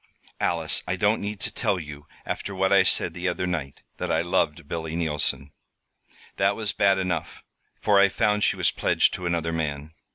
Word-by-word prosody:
"Alice, - - +1
I 90 - 0
don't 105 +4 +1
need 105 0 -4
to - - -1
tell 100 -6 0
you, 75 -2 -10 0.2
after 100 - -4
what 95 +1 +2
I 100 - +7
said - - +4
the 90 +2 -3
other 90 0 -1
night, 80 -6 -4
that - - -3
I 80 - +2
loved 85 -3 0
Billy 80 0 -4
Neilson. 75 -4 -1 0.9
That 100 +1 +2
was 110 -2 -3
bad 100 -1 +3
enough, 90 -4 -3 0.4
for 105 -2 +3
I 100 0 +6
found 105 +1 +1
she - - +2
was - - +2
pledged - - +2
to 90 -1 -4
another 85 -1 -1
man. 75 -1 -3
90 Hz, 190 wpm, -25 LUFS, 80-100 Hz, 0.9 s, I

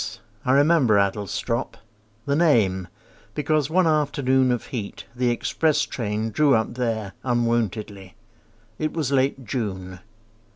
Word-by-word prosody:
I 130 - +2
remember 140 -5 +4
Adlestrop— 100 +4 -1 0.5
The 140 - +1
name, 110 - +2 0.5
because 150 -1 +1
one 180 +2 +3
afternoon 140 -4 +2
Of 120 - -2
heat 110 -5 -5
the 125 0 +1
express 150 +5 +1
train 110 -1 -3
drew 145 +4 +4
up 110 +1 0
there 115 -5 -2
Unwontedly. 110 -6 -1 0.6
It 155 0 -1
was 150 -5 -2
late 135 -1 +1
June. 95 -6 -4
120 Hz, 120 wpm, -24 LUFS, 105-140 Hz, 0.6 s, remember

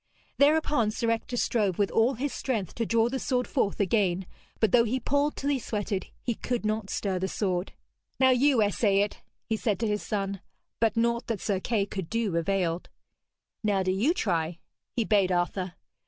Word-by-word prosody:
Thereupon 290 -5 +4
Sir 230 +2 0
Ector 230 +2 -2
strove 205 -7 +1
with 200 -1 +1
all 235 +4 +3
his 275 +4 -2
strength 220 -9 -2
to 230 -2 -2
draw 230 0 +3
the 265 +2 -2
sword 250 -1 0
forth 225 -9 -1
again, 190 -3 +1 0.3
but 220 -4 +3
though 235 +1 +6
he 245 +3 -1
pulled 285 +4 +1
till 285 +1 -1
he 275 - +1
sweated, 205 -4 -3 0.2
he 240 - 0
could 240 0 -3
not 215 -1 -1
stir 190 -3 -1
the 190 - -1
sword. 185 -2 -2 0.5
'Now 260 -1 +6
you 255 -2 +4
essay 205 -1 +2
it,' 205 - -2 0.2
he 220 - 0
said 210 -4 0
to 225 - +1
his 210 0 0
son. 195 -2 -3 0.4
But 225 0 +2
naught 235 +1 +1
that 225 -4 -2
Sir 195 -1 -1
Kay 210 0 0
could 190 -4 -5
do 225 -6 -1
availed. 175 0 0 0.7
'Now 200 -3 +2
do 185 - +1
you 235 - +2
try,' 170 - -1 0.3
he 235 - 0
bade 200 -4 +3
Arthur. 180 +1 -1
215 Hz, 190 wpm, -28 LUFS, 195-240 Hz, 0.7 s, though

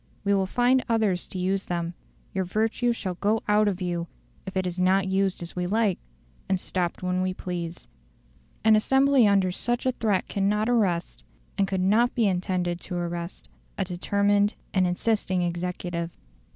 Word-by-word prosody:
We 200 0 +2
will 195 -1 +2
find 250 +5 +3
others 215 -6 +1
to - - -7
use 190 +2 0
them; 170 -1 -2 0.4
your 190 - 0
virtue 225 +6 0
shall 200 -5 -3
go 210 +5 0
out 210 0 +4
of 190 -2 -1
you 175 -1 -2 0.4
if 190 - -4
it 190 - 0
is 180 0 -3
not 190 +1 +3
used 190 -1 0
as 170 - -8
we 180 0 -1
like, 210 -1 +1 0.5
and 190 -1 +2
stopped 180 -1 -2
when 180 0 0
we 185 0 -1
please." 175 -2 -5 0.8
An 220 0 +6
assembly 265 +2 +4
under 195 -2 +3
such 240 +7 -2
a 260 - +3
threat 215 -6 0
cannot 205 +2 0
arrest, 190 -8 0 0.3
and 195 - +1
could 190 -1 -1
not 220 +6 +3
be 235 -3 +3
intended 180 -2 -1
to 180 - -6
arrest, 175 0 -4 0.3
a 195 - +1
determined 200 +3 +1 0.2
and 185 -2 +3
insisting 185 0 0
executive. 175 -1 -3
190 Hz, 170 wpm, -26 LUFS, 180-210 Hz, 0.8 s, An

